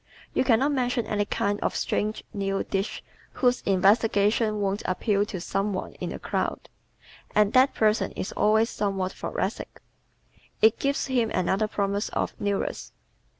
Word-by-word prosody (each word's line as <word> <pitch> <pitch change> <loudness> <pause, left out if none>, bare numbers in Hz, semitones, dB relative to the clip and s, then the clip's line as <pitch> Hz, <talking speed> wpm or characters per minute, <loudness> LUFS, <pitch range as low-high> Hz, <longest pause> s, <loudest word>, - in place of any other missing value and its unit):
You - - +2
can 245 -4 +4
not 275 +5 +1
mention 245 -3 0
any 205 -1 0
kind 205 0 -1
of - - -1
strange 215 +1 -1
new 195 -1 -1
dish 195 +1 -3 0.3
whose 250 -1 +2
investigation 210 +2 +3
won't 200 0 -1
appeal 205 +2 +1
to 195 -4 -5
some 195 +4 -1
one 185 - -4
in - - -2
the - - -5
crowd, - - -3 0.7
and 210 -1 +4
that 260 +2 +5
person 215 -3 +2
is - - -4
always 220 +2 +2
somewhat 195 -2 -1
thoracic. - - -4 0.8
It 220 +1 +4
gives 280 0 0
him 245 -4 +1
another 190 +3 +1
promise 200 0 -1
of - - -2
"newness." 205 -1 -2
210 Hz, 150 wpm, -26 LUFS, 195-225 Hz, 0.8 s, that